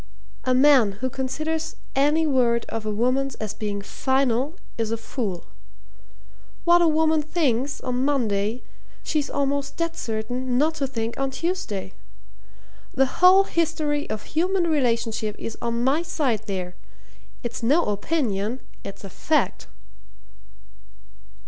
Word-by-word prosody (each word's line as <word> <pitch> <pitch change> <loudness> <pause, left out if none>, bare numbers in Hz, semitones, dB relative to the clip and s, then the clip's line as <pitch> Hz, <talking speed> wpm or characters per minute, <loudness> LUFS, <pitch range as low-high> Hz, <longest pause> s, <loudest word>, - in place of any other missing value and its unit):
A 255 0 +3
man 260 -6 +6
who 255 +6 -3
considers 310 +5 -2 0.2
any 295 +4 +3
word 245 -5 +2
of 225 -1 -4
a - - 0
woman's 255 +5 0
as 215 -1 -4
being 205 -2 -4
final 265 - 0 0.2
is 225 -2 -1
a 230 - -1
fool. 220 -6 -4 1.2
What 345 0 +5
a 340 - +5
woman 315 0 +3
thinks 290 -4 0
on 250 0 -1
Monday 230 -5 0 0.4
she's 300 -3 -1
almost 280 0 -1
dead 335 0 -1
certain 245 +3 -2
not 310 +4 +3
to 275 - +2
think 230 -2 -4
on 270 0 0
Tuesday. 265 - -3 1.0
The 270 0 +4 0.2
whole 370 +2 +8
history 310 -5 -1
of 215 - -4
human 360 +3 +1
relationship 230 -8 0
is 225 - -5
on 235 0 -1
my 275 +5 +3
side 260 -10 -1
there. 180 -2 -4 0.7
It's 240 0 -4
no 290 +9 +3
opinion 215 0 -1 0.2
it's 200 - -8
a 195 - -7
fact." - - 0
260 Hz, 130 wpm, -24 LUFS, 225-305 Hz, 1.2 s, whole